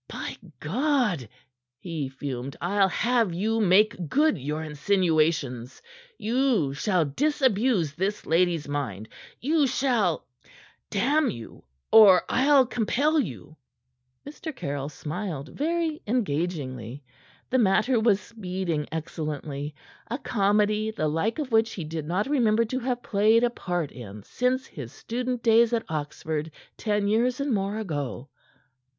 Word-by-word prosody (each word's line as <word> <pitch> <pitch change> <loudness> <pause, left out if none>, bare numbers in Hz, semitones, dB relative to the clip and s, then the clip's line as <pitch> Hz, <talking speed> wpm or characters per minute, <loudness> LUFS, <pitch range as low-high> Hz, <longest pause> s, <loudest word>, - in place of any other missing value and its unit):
"By - - -5 0.2
God!" 215 - 0 0.5
he 155 -4 -4
fumed, 135 -1 -6
"I'll 195 +3 +2
have 230 -3 +1
you 220 +5 0
make 185 -3 +3
good 300 -1 +3
your 150 +4 -3
insinuations. 155 -6 0 0.4
You 230 - +1
shall 175 +3 +1
disabuse 230 - +1
this 195 +5 -2
lady's 165 -2 +2
mind. 120 -8 -4 0.3
You 295 +2 +2
shall 235 - +1 0.6
damn 280 +9 +2
you! 115 - -9 0.3
or 205 -5 +8
I'll 270 +1 +5
compel 265 +7 +1
you!" 150 - -5 0.7
Mr. 300 +1 -7
Caryll 140 - -4
smiled 155 -1 -5
very 320 +1 -1
engagingly. 145 - -2 0.5
The 260 - +3
matter 225 +3 +3
was 220 -3 +3
speeding 185 -7 -4
excellently 150 -2 -4 0.3
a 240 - -2
comedy 210 -2 +1
the 215 -8 -1
like 165 +9 0
of 290 -5 -4
which 225 0 +3
he 175 - -5
did 155 -1 -5
not 185 +5 0
remember 230 -5 +2
to 255 +4 -3
have 245 -1 -2
played 215 +3 +3
a 240 - +2
part 175 -8 -3
in 105 -4 -10
since 255 - -1
his 130 - -9
student 245 - -4
days 230 0 +5
at 230 - 0
Oxford, 155 0 -3 0.3
ten 210 -2 0
years 240 +5 +1
and 280 -2 0
more 200 +1 -1
ago. 145 - -4
200 Hz, 130 wpm, -26 LUFS, 150-240 Hz, 0.7 s, or